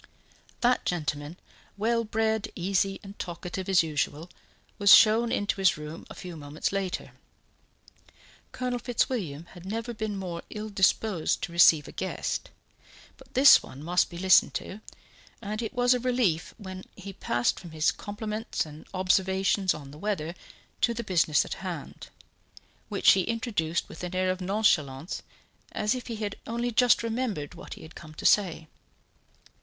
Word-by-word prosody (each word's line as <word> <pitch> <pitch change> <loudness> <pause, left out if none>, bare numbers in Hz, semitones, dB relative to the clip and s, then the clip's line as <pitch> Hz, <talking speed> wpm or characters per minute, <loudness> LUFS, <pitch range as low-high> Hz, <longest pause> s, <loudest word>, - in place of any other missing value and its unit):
That 250 +1 +3
gentleman, 150 -1 -3 0.4
well 230 +3 +1
bred, 220 0 -1
easy 195 +2 0
and 200 0 -11
talkative 180 +2 -5
as 185 -3 +5
usual, 155 +1 -2 0.5
was 200 -1 +9
shown 230 +2 +5
into 205 +1 0
his 190 -4 +3
room 150 +2 -8
a - - -9
few 180 -2 -8
moments 145 0 -3
later. 195 -2 -3 1.4
Colonel 250 -1 -2
Fitzwilliam 210 - -2
had 175 -2 -12
never 225 +5 -4
been 215 -2 -3
more 175 -3 -5
ill 215 0 -6
disposed 195 -2 +1
to - - -3
receive 165 -3 +6
a - - -9
guest, - - -3 0.7
but - - -19
this 270 +2 +8
one 140 +3 -11
must 175 +3 +2
be 170 - -9
listened 185 0 +5
to, 205 +3 -5 0.6
and 215 +1 -4
it 225 - -3
was 245 0 +3
a 250 - 0
relief 245 -10 0
when 190 -3 -8
he 195 0 -9
passed 120 -9 0
from 175 - -10
his 155 0 +1
compliments 215 0 -4
and 155 0 -12
observations 190 +1 +2
on 140 -2 -6
the 150 - -12
weather 170 -5 -2 0.5
to 235 - +2
the 235 - -3
business 170 -7 +2
at - - -4
hand, 175 -6 -6 0.8
which - - +5
he 190 - +4
introduced 205 -6 -1
with 160 - -10
an 180 +1 -4
air 185 0 +2
of 185 0 -4
nonchalance, 175 -7 +1 0.5
as 210 +2 +1
if 250 -2 -6
he 230 - -4
had 210 -1 -4
only 235 +1 -2
just 245 +1 +4
remembered 225 - -2
what 175 - -9
he - - -13
had 160 +1 -12
come 155 -2 -12
to - - -8
say. 175 -6 +3
190 Hz, 160 wpm, -28 LUFS, 170-220 Hz, 1.4 s, was